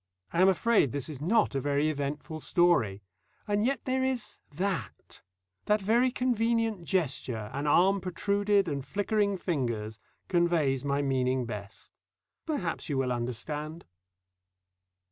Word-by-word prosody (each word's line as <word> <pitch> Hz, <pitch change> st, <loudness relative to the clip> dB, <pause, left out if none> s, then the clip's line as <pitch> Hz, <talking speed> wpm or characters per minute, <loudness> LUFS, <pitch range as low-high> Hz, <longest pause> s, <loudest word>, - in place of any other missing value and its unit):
I 170 Hz, -, +2 dB
am 190 Hz, -, +7 dB
afraid 195 Hz, -, +3 dB
this 140 Hz, +1 st, -3 dB
is 145 Hz, -3 st, -7 dB
not 210 Hz, +5 st, +2 dB
a 135 Hz, -, -1 dB
very 145 Hz, +2 st, +1 dB
eventful 150 Hz, +1 st, -3 dB
story, 145 Hz, -, +2 dB, 0.4 s
and 205 Hz, 0 st, +1 dB
yet 270 Hz, +4 st, 0 dB
there 260 Hz, 0 st, 0 dB
is 250 Hz, -5 st, -2 dB
that 170 Hz, -, -4 dB, 0.4 s
That 210 Hz, 0 st, +3 dB
very 230 Hz, +6 st, +3 dB
convenient 230 Hz, -5 st, 0 dB
gesture, 130 Hz, -, -1 dB
an 140 Hz, +2 st, -2 dB
arm 190 Hz, +6 st, +4 dB
protruded 200 Hz, +2 st, +1 dB
and 140 Hz, -4 st, -2 dB
flickering 200 Hz, +5 st, 0 dB
fingers, 120 Hz, -, -2 dB, 0.3 s
conveys 170 Hz, -7 st, +2 dB
my 140 Hz, 0 st, 0 dB
meaning 130 Hz, -2 st, +1 dB
best. 100 Hz, -3 st, -8 dB, 0.6 s
Perhaps 205 Hz, -, -2 dB
you 140 Hz, -, 0 dB
will 130 Hz, -1 st, 0 dB
understand. 145 Hz, +7 st, -4 dB
165 Hz, 130 wpm, -29 LUFS, 135-205 Hz, 0.6 s, am